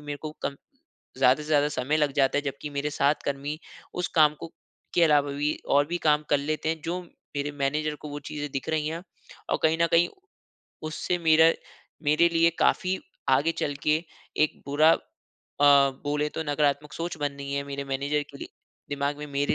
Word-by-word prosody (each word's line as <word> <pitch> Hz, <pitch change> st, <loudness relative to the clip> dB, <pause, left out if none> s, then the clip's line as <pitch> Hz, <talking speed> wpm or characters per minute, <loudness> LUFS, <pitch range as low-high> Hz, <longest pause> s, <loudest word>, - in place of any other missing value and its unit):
मेरे 145 Hz, 0 st, -3 dB
को 155 Hz, -, -4 dB
कम 140 Hz, -, -2 dB, 0.6 s
ज़्यादा 135 Hz, +2 st, +4 dB
से -, -, -9 dB
ज़्यादा 145 Hz, -1 st, +3 dB
समय 150 Hz, 0 st, 0 dB
लग 150 Hz, -2 st, +1 dB
जाता 135 Hz, 0 st, +3 dB
है -, -, -1 dB
जब 140 Hz, -2 st, -3 dB
की 150 Hz, -, -4 dB
मेरे 145 Hz, +1 st, -2 dB
साथ 145 Hz, 0 st, +2 dB
कर्मी 140 Hz, +2 st, -3 dB, 0.4 s
उस 180 Hz, 0 st, -2 dB
काम 150 Hz, -1 st, +6 dB
को 165 Hz, -, -8 dB, 0.4 s
के 175 Hz, -, +4 dB
अलावा 145 Hz, -2 st, +3 dB
भी 145 Hz, +2 st, 0 dB, 0.2 s
और 145 Hz, +1 st, +4 dB
भी 175 Hz, +3 st, -2 dB
काम 150 Hz, 0 st, +4 dB
कर 145 Hz, -, +4 dB
लेते 155 Hz, +2 st, -2 dB
हैं 160 Hz, 0 st, -1 dB
जो 175 Hz, +2 st, -2 dB, 0.4 s
मेरे 145 Hz, +1 st, -1 dB
मैनेजर 150 Hz, +2 st, 0 dB
को 150 Hz, -, -6 dB
वो 145 Hz, -, -5 dB
चीजें 145 Hz, -1 st, -4 dB
दिख 135 Hz, -, -4 dB
रही 155 Hz, -1 st, 0 dB
है। 165 Hz, +2 st, -4 dB, 0.5 s
और -, -, +1 dB
कहीं 160 Hz, 0 st, +3 dB
न -, -, +5 dB
कहीं 170 Hz, +1 st, +5 dB, 0.8 s
उससे 180 Hz, +3 st, -1 dB
मेरा 160 Hz, +1 st, +7 dB, 0.5 s
मेरे 155 Hz, +3 st, +4 dB
लिए 165 Hz, 0 st, +5 dB
काफ़ी 185 Hz, 0 st, +2 dB, 0.3 s
आगे 165 Hz, -, +3 dB
चल 145 Hz, -, -1 dB
के 155 Hz, +2 st, +3 dB, 0.4 s
एक 155 Hz, -, -5 dB
बुरा 150 Hz, +3 st, +5 dB
अ, -, -, +1 dB, 1.0 s
बोले 150 Hz, +1 st, 0 dB
तो 160 Hz, -, -3 dB
नकारात्मक 145 Hz, 0 st, 0 dB
सोच 170 Hz, 0 st, -4 dB
बननी 140 Hz, -1 st, -3 dB
है 140 Hz, 0 st, -1 dB
मेरे 140 Hz, 0 st, -4 dB
मैनेजर 140 Hz, +2 st, -1 dB
के -, -, -12 dB
लिए 340 Hz, +2 st, -7 dB, 0.4 s
दिमाग 145 Hz, 0 st, -1 dB
में 150 Hz, -, -6 dB
मेरे 140 Hz, +1 st, 0 dB
150 Hz, 195 wpm, -26 LUFS, 140-155 Hz, 1.0 s, मेरा